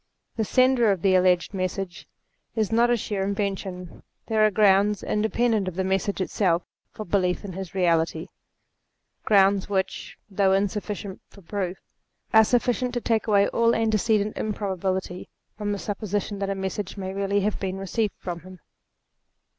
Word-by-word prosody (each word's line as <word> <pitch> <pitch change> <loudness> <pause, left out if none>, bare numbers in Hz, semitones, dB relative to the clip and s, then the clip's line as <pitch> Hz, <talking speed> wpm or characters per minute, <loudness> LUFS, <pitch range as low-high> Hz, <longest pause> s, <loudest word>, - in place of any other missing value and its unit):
The 225 - 0
sender 255 -1 +4
of 190 -4 -2
the 195 -1 +4
alleged 180 0 +3
message 185 -1 -4 0.5
is 220 -2 0
not 235 +2 +4
a 240 - +3
sheer 200 -2 -2
invention; 195 -3 -4 0.2
there 220 -2 +2
are 215 - +6
grounds 205 0 +3
independent 220 -1 +1
of 185 - -4
the 190 - -1
message 195 +1 -1
itself 185 -2 +1 0.3
for 215 - -8
belief 180 0 0
in 190 - -6
his 190 0 -7
reality; 165 -2 +1 1.0
grounds 195 -1 +4
which, 190 -2 -2
though 195 -1 +2
insufficient 200 0 -2
for 200 - -17
proof, 190 0 -3 0.6
are 220 0 +8
sufficient 245 +2 0
to 240 - -1
take 225 -1 0
away 200 -2 +4
all 230 0 +2
antecedent 215 -1 +1
improbability 190 -3 -3 0.3
from 210 -1 -3
the 205 - -1
sup 205 +1 -4
position 205 -1 -3
that 195 0 -2
a 195 - -1
message 190 +1 -4
may 190 -1 -4
really 200 +1 0
have 210 +1 -1
been 190 -1 -3
received 200 +2 -2
from 175 -2 -5
him. 185 +2 -13
200 Hz, 160 wpm, -25 LUFS, 190-215 Hz, 1.0 s, are